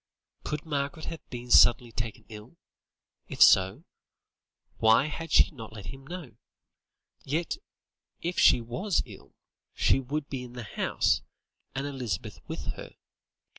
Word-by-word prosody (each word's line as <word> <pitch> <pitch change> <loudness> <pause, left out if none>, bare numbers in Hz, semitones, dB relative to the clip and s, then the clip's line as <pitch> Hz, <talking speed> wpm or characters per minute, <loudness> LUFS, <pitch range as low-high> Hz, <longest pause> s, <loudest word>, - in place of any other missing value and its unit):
Could 150 0 -4
Margaret 145 +1 -3
have 165 - -8
been 120 -1 -7
suddenly 120 0 +6
taken 115 -1 -5
ill? 110 +8 -12 0.7
If - - -8
so, 95 0 +6 0.9
why 110 +4 +5
had 160 +1 -6
she - - +6
not 115 -7 -10
let 105 +3 -8
him 135 0 -13
know? 155 - -8 0.9
Yet, 160 - -2 0.6
if 175 +1 -2
she 120 - +6
was 160 - -1
ill, - - -14 0.4
she - - +3
would 140 +3 -3
be 135 -2 -4
in 120 -1 -10
the 120 -1 -6
house, 105 - 0 0.5
and 135 +1 -2
Elizabeth 135 -5 -4
with - - -4
her. - - -10
135 Hz, 135 wpm, -28 LUFS, 115-155 Hz, 0.9 s, suddenly